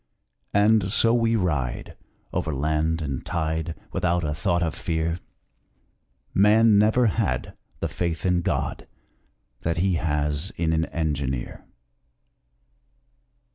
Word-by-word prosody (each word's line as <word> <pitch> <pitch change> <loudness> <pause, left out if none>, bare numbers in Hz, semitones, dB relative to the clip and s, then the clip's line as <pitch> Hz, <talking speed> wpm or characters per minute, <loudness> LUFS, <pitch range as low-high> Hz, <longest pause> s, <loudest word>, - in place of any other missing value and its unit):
And 105 -2 +4
so 115 +2 +4
we 115 -1 +2
ride 75 - -2 0.4
Over 80 -3 -1
land 80 +3 0
and 70 -4 -3
tide, 80 0 -2 0.2
Without 90 0 0
a 75 -1 -1
thought 85 +2 0
of 80 -2 -1
fear 80 +1 -2 1.2
_Man 105 +3 +5
never 110 +4 +4
had 100 -10 -1 0.3
The - - 0
faith 85 -1 -3
in 90 -1 +2
God - - -2 0.7
That 85 0 -1
he 90 0 +2
has 75 +2 0
in 80 -1 +1
an 80 0 +1
engineer! 70 -7 -3
85 Hz, 115 wpm, -25 LUFS, 75-95 Hz, 1.2 s, Man